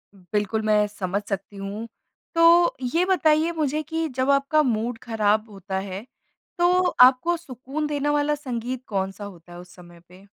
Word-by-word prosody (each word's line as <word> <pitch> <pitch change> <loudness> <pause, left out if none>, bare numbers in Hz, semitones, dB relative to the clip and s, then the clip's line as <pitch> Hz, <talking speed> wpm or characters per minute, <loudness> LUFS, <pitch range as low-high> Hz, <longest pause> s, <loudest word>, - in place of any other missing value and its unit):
बिल्कुल 210 +3 -2
मैं 210 -1 +3
समझ 200 -1 -3
सकती 200 +1 -5
हूँ। 200 +3 -6 0.5
तो 335 +1 +5 0.2
ये 350 +2 +3
बताइए 320 -3 +2
मुझे 305 0 0
कि 320 +1 -2
जब 260 +1 0
आपका 275 +2 +3
मूड 230 -1 -1
ख़राब 215 -1 0
होता 195 -1 -6
है 195 +3 -6 0.5
तो 350 +1 +3 0.3
आपको 260 +7 +6
सुकून 280 0 -5
देने 290 0 -1
वाला 295 0 +1
संगीत 255 -2 -5
कौन-सा 195 0 -3
होता 175 -3 -12
है 175 - -10
उस 180 0 -14
समय 175 -1 -15
पे? 185 +2 -17
230 Hz, 160 wpm, -24 LUFS, 200-295 Hz, 0.5 s, आपको